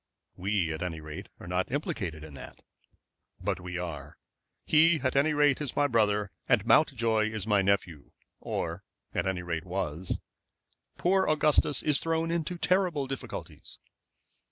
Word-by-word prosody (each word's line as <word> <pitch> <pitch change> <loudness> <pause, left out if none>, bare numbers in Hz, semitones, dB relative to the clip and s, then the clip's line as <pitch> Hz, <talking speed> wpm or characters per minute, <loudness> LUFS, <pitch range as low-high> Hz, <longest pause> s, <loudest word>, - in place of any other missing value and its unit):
"We 95 -4 0
at 80 - -6
any 85 -3 -3
rate 75 -1 -8
are - - -10
not 90 +3 -1
implicated 95 - -3
in 80 -2 -10
that." 70 - -10 0.8
"But - - -2
we 90 0 -5
are. 75 -5 -6 0.5
He 160 +1 +5
at 130 -1 0
any 140 +3 +4
rate 145 -1 +3
is 145 -5 -4
my 145 - +3
brother, 105 -5 +2 0.2
and 120 -5 +3
Mountjoy 115 -6 +3
is 110 -2 -3
my 105 -2 +3
nephew, 95 -6 0 0.3
or - - -3 0.3
at - - 0
any 90 -2 -1
rate 85 -2 -3
was. 90 -2 -2 0.8
Poor 190 +2 +2
Augustus 150 -1 +3
is 150 -2 +3
thrown 165 0 0
into 170 +1 -1
terrible 180 -5 +1
difficulties." 135 0 -7
110 Hz, 150 wpm, -29 LUFS, 90-150 Hz, 0.8 s, He